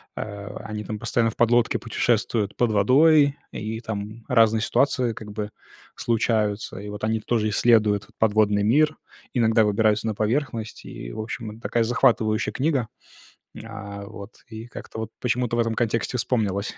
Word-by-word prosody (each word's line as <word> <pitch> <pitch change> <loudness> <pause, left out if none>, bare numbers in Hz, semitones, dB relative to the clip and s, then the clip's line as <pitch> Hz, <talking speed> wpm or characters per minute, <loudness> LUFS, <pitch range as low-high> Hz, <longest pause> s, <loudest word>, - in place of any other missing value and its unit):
а, 100 -1 -6
они 105 -1 -5
там 105 +1 -5
постоянно 115 -1 +1
в - - -16
подлодке 120 0 +3
путешествуют 115 -2 0
под 120 -3 +1
водой, 140 +7 +5 0.2
и 110 +1 -4
там 110 0 -6
разные 115 -3 +4
ситуации, 130 -1 +1
как 105 -1 -9
бы, 105 0 -4 0.5
случаются. 110 -3 0
И 105 +1 -7
вот 105 0 -8
они 110 0 +1
тоже 110 -1 0
исследуют 105 -1 +3
подводный 105 -2 +3
мир, 150 +8 +3 0.4
иногда 115 -2 +3
выбираются 105 +1 +2
на 110 - 0
поверхность, 115 0 -2
и, - - -8
в - - -7
общем, 110 0 -5
это 110 +2 -13
такая 115 +2 +1
захватывающая 115 -3 +2
книга. 135 -5 0 0.7
А, 100 -2 -8
вот. 100 +2 -10 0.2
И 110 0 -8
как-то 110 - -8
вот 110 0 -5
почему-то 125 -1 0
в - - +2
этом 115 -1 0
контексте 115 +1 -1
вспомнилось 105 -5 -1
110 Hz, 155 wpm, -24 LUFS, 105-120 Hz, 0.7 s, водой